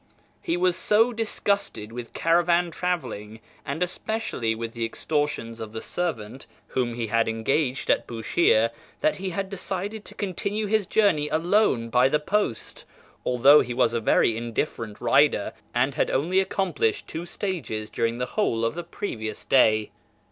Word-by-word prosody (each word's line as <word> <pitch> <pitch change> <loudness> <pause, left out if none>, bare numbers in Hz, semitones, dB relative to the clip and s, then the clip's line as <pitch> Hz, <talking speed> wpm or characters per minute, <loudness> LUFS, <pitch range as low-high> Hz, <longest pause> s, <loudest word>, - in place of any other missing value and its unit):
He 170 - -1
was 180 0 +2
so 225 +6 +3
disgusted 200 - -1
with 120 0 -8
caravan 170 +1 +2
travelling, 125 - -3 0.2
and 145 +6 -2
especially 180 - -2
with 115 0 -5
the 115 - -3
extortions 115 -2 -2
of 110 -1 -7
the 110 - -4
servant 130 -7 -4 0.2
whom 120 -2 -1
he 120 -1 -2
had 115 +1 +1
engaged 125 +4 0
at - - +1
Bushire, 115 0 +2 0.3
that 310 +1 +2
he 190 0 -3
had 195 +2 -3
decided 200 +2 -4
to - - -12
continue 200 +2 -2
his 210 -2 +1
journey 155 -9 +2
alone 160 - +2
by 125 +2 +4
the 150 - +3
post, 155 - -2 0.4
although 135 +4 +7
he 120 0 -4
was 120 -2 +2
a 115 - 0
very 110 +1 +3
indifferent 115 -1 -3
rider, 130 -2 +3 0.2
and 130 +3 +2
had - - 0
only 170 +8 +2
accomplished 190 - 0
two 170 +2 -6
stages 145 - -4
during 115 +1 -1
the 125 - -1
whole 115 - +1
of 115 - 0
the 175 +2 -5
previous 115 - -5
day. 110 -5 +3
140 Hz, 155 wpm, -25 LUFS, 115-185 Hz, 0.4 s, although